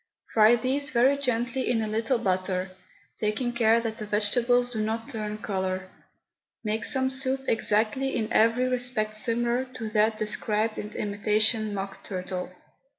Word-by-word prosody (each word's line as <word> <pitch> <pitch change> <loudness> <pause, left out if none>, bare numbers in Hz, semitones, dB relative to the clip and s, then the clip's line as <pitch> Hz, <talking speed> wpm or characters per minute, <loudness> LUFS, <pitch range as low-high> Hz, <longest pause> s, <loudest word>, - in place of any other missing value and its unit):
Fry 220 +1 +6
these 265 +4 0
very 260 +2 +4
gently 250 -2 -1
in 240 -2 +2
a - - -2
little 225 +4 0
butter, 185 -3 -1 0.5
taking 220 +3 -1
care 230 -1 +4
that 225 -1 -4
the 215 - -4
vegetables 245 +4 +2
do 220 -3 -2
not 225 +1 -2
turn 215 -1 -4
colour. 190 -2 -3 0.7
Make 215 0 -1
some 260 -1 +2
soup 265 0 -2
exactly 225 +5 +1
in 225 0 -2
every 230 +3 +3
respect 245 -4 -1
similar 235 +4 0
to 220 -3 -5
that 215 0 +2
described 215 +1 -1
in 210 - -5
Imitation 215 +1 +1
Mock 195 0 -6
Turtle. 185 -1 -4
220 Hz, 150 wpm, -27 LUFS, 210-245 Hz, 0.7 s, Fry